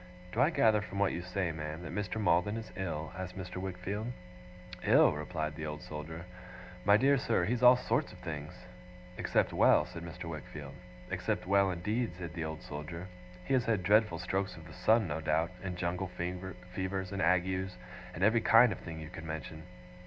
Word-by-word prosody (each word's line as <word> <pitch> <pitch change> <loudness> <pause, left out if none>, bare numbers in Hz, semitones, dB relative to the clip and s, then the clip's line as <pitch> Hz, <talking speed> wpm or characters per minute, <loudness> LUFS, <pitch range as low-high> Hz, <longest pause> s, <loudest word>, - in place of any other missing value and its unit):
'Do 115 - +1
I 140 - +6
gather 110 -9 +4
from 100 -1 -7
what 100 -2 +3
you 85 - -3
say, 90 -1 -1
ma'am, 80 +1 -5
that 85 - -6
Mr. 105 +1 -2
Maldon 105 +1 +2
is 115 - -7
ill?' 80 -4 -3
asked 90 0 -6
Mr. 90 -1 -6
Wickfield. 95 +3 -3 0.8
'Ill!' - - +6
replied 75 0 -3
the 80 0 -4
Old 75 0 -6
Soldier. 80 +2 -7 0.6
'My 100 +1 +7
dear 135 +3 +4
sir, 90 -8 +1
he's 120 +4 0
all 125 0 +9
sorts - - 0
of - - -12
things.' 75 +2 -7 0.5
'Except - - +1
well?' - - +5
said 85 - -8
Mr. 85 +2 -7
Wickfield. 75 -3 -7 0.4
'Except - - -1
well, 100 +1 +4
indeed!' 105 +5 -1
said 85 -2 -6
the 85 -2 -3
Old 80 0 -5
Soldier. 85 +5 -6 0.4
'He - - 0
has 125 -3 +3
had 110 -5 +1
dreadful 105 -2 +4
strokes 95 +2 -2
of 85 - -11
the 80 - -11
sun, 110 +3 +3
no 80 +1 -3
doubt, 80 +2 +1
and 90 -2 -4
jungle 90 +1 -1
fevers 90 +1 -4
and 100 -1 -2
agues, 90 +2 +1 0.4
and 85 - -2
every 110 +2 +5
kind 115 +1 +7
of - - -4
thing 80 -2 -7
you 80 -1 -7
can 80 0 -8
mention. 80 0 -5
90 Hz, 190 wpm, -32 LUFS, 80-100 Hz, 0.8 s, all